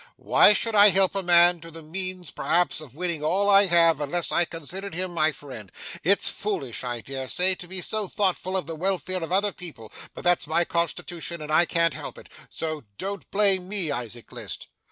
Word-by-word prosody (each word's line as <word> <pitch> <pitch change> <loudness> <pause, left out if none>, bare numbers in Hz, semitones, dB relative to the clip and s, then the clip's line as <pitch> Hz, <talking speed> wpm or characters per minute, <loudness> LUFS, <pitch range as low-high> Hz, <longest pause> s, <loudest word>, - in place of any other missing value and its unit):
Why 210 - +6
should 225 +2 0
I 205 0 +8
help 190 0 +2
a 195 - -1
man 175 -1 +4
to 165 - -9
the 165 0 -11
means 185 +1 -4
perhaps 175 -2 0
of 140 -4 -12
winning 170 -2 -3
all 190 +6 +1
I 200 0 +6
have, 165 -3 +3
unless 165 +4 -2
I 175 - +2
considered 170 +4 -7
him 180 0 -4
my 160 -1 +2
friend? 130 - -10 0.3
It's 200 +4 +3
foolish, 140 - -3
I 120 -2 -4
dare 135 +1 -6
say, 185 +7 +2
to 180 -1 -9
be 185 +1 -4
so 215 +3 0
thoughtful 190 -1 0
of 185 - -3
the 165 - -6
welfare 185 +1 -2
of 165 - -6
other 200 +2 +3
people, 155 - -9 0.2
but - - -9
that's 175 -3 +1
my 170 +2 +1
constitution, 170 0 -3
and 155 0 -7
I 170 +3 +4
can't 170 -1 +1
help - - -7
it; - - -14 0.2
so 155 -2 -5
don't 200 +1 -6
blame 195 -3 +2
me, 195 -7 0
Isaac 120 -3 -6
List. - - -6
175 Hz, 205 wpm, -25 LUFS, 155-190 Hz, 0.3 s, I